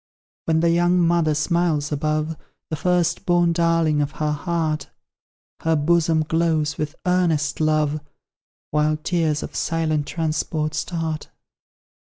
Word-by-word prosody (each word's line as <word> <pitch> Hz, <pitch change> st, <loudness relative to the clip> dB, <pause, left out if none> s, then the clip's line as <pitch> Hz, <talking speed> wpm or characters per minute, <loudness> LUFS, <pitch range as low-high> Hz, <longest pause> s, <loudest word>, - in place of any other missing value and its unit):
When 160 Hz, -1 st, +2 dB
the 170 Hz, 0 st, +3 dB
young 175 Hz, +1 st, +3 dB
mother 170 Hz, -3 st, +2 dB
smiles 155 Hz, -2 st, 0 dB
above 155 Hz, +2 st, -1 dB, 0.4 s
The -, -, 0 dB
first 180 Hz, +2 st, +1 dB
born 175 Hz, -1 st, +3 dB
darling 165 Hz, -3 st, +2 dB
of 145 Hz, 0 st, -2 dB
her 150 Hz, -1 st, -1 dB
heart, 155 Hz, 0 st, -2 dB, 0.7 s
Her 160 Hz, 0 st, +1 dB
bosom 160 Hz, +1 st, +2 dB
glows 160 Hz, -2 st, 0 dB
with 150 Hz, +1 st, -3 dB
earnest 170 Hz, -5 st, +1 dB
love, 155 Hz, -1 st, +1 dB, 0.7 s
While 150 Hz, 0 st, +2 dB
tears 160 Hz, -2 st, 0 dB
of -, -, -8 dB
silent 155 Hz, -3 st, 0 dB
transport 155 Hz, -1 st, -2 dB
start. 160 Hz, -1 st, -3 dB
160 Hz, 125 wpm, -22 LUFS, 155-170 Hz, 0.7 s, the